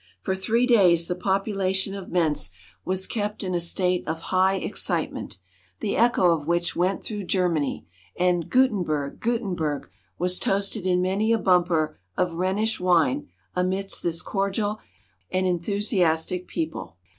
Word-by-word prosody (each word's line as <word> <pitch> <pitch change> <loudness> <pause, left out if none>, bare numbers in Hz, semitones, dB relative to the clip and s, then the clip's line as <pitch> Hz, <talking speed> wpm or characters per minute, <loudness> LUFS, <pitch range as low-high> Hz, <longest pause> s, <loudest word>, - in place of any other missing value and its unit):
For 190 - 0
three 225 +6 +1
days 180 -9 +5
the 180 - -2
population 190 +1 0
of 195 -2 -7
Mentz 155 - +1 0.3
was 190 0 +1
kept 210 -2 -3
in 185 -1 -2
a 175 - 0
state 180 +1 +2
of 160 +1 -2
high 190 +1 +4
excitement, 185 - -1 0.4
the 200 - -2
echo 230 -7 +4
of 155 -3 -1
which 170 0 0
went 185 +3 0
through 205 -3 -5
Germany, 170 - 0 0.3
and 175 -2 +1
"Gutenberg! 180 - +1
Gutenberg!" 185 - -2 0.3
was 180 +1 +1
toasted 195 0 0
in 180 0 +2
many 200 +4 +1
a 230 - +4
bumper 175 - +2 0.2
of 180 -2 +1
Rhenish 190 +6 0
wine 180 - +2 0.3
amidst 190 +2 0
this 170 0 -1
cordial 205 +2 -1 0.5
and 185 0 0
enthusiastic 180 -2 0
people. 325 -2 -5
185 Hz, 140 wpm, -25 LUFS, 175-200 Hz, 0.5 s, days